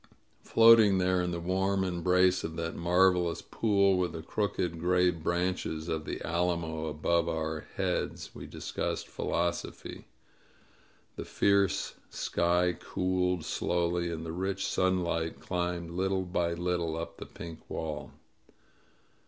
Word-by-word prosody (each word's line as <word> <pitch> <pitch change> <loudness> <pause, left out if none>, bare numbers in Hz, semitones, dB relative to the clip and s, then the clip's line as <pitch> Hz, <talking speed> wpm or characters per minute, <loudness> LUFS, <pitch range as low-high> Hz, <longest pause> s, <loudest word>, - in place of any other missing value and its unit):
Floating 115 -3 +6
there 90 0 +2
in 90 - -1
the 85 -1 -3
warm 95 +2 0
embrace 90 +1 +2
of 80 0 -4
that 80 0 -3
marvelous 90 0 +2
pool, 100 -4 +2
with 90 -1 0
the 80 - -6
crooked 90 -3 -2
gray 90 +1 +3
branches 85 -1 -2
of 80 -2 -2
the - - -4
alamo 85 -2 -1
above 85 +2 +1
our 80 -1 -3
heads, - - -2
we - - -9
discussed - - -4
philosophy. 85 +1 -3 1.1
The - - -5
fierce 100 -1 +2 0.2
sky 90 +1 +1
cooled 90 -2 -1
slowly, 85 0 0
and 80 0 -5
the 80 - -4
rich 95 +3 -2
sunlight 85 -3 0
climbed 90 -2 -3
little 95 +2 0
by 90 -1 -1
little 85 -2 -1
up 85 0 -6
the - - -8
pink 80 -2 -10
wall. 75 -4 -4
90 Hz, 130 wpm, -30 LUFS, 85-95 Hz, 1.1 s, Floating